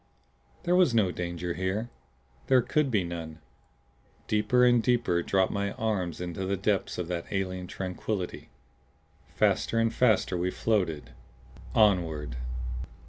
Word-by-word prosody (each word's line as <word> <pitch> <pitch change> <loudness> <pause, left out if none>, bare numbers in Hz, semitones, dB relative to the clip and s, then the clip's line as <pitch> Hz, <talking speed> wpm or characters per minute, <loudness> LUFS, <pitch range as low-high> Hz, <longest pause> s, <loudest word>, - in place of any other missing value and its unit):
There 175 - +2
was 180 -10 +4
no 100 -5 +3
danger 85 0 -3
here 95 +6 -2 0.6
there 130 -2 +5
could 150 +1 +1
be 105 -6 +2
none. 85 -2 -6 0.9
Deeper 125 +4 +3
and 120 -1 +5
deeper 120 -8 +2
dropped 95 +1 +1
my 100 0 -2
mind 95 -7 -1
into 90 +1 -4
the 95 +1 -1
depths 100 +1 0
of 90 - -3
that 85 -1 -3
alien 95 -2 -2
tranquillity. 95 +1 -4 0.9
Faster 115 - +2
and 115 0 +2
faster 110 -6 +3
we 90 +1 0
floated 85 - -1 0.6
onward. 80 - +2
95 Hz, 130 wpm, -28 LUFS, 90-110 Hz, 0.9 s, there